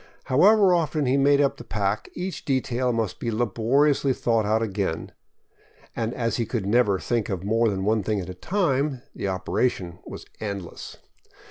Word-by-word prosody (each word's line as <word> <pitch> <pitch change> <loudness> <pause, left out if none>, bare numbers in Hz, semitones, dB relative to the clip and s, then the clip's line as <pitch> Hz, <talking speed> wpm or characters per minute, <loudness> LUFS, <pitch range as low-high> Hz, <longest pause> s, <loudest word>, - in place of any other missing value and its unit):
However 190 +8 +5
'often 155 -3 +1
he 130 +1 +2
made 140 +1 +4
up 140 -1 +1
the - - -9
pack, 105 -2 -2
each 185 +1 -5
detail 130 -2 0
must 115 -4 -2
be 120 - -2
laboriously 120 +6 +2
thought 115 -4 0
out 110 +2 +2
again, 95 -6 -3 0.8
and 115 -1 -1
as 115 -1 -1
he 115 - 0
could 115 -6 -2
never 105 -2 +3
think 115 +3 -1
of 95 -3 -3
more 115 +3 +2
than 95 -1 -2
one 110 +1 +2
thing 105 +1 -1
at 90 - -5
a 90 - -6
time, 140 - -1
the - - -4
operation 95 -1 -1
was - - -9
endless. 100 -4 -6
115 Hz, 170 wpm, -25 LUFS, 100-135 Hz, 0.8 s, However